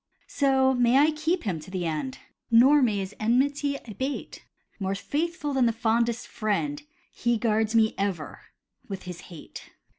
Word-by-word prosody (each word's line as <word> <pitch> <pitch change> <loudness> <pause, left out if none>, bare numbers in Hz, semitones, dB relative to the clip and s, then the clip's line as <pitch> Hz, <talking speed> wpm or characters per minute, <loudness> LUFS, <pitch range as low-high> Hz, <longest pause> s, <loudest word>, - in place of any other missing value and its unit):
So 265 -2 +3
may 245 0 +3
I 300 +3 +5
keep 320 +3 -1
him 185 -7 -2
to 155 - -12
the 185 -2 -3
end, 165 +12 -3 0.3
Nor 260 +5 +6
may 220 -5 +2
his 195 +1 -4
enmity 280 +5 +1
abate: 260 +7 -5 0.4
More 195 0 -1
faithful 295 - -2
than 260 -3 +3
the - - +3
fondest 230 +1 0
friend, 285 +8 -2 0.3
He 235 0 0
guards 220 0 +1
me 220 -1 +4
ever 195 -6 -3 0.5
with 195 -1 -6
his 180 -1 -7
hate. 165 -4 -11
235 Hz, 155 wpm, -26 LUFS, 200-275 Hz, 0.5 s, Nor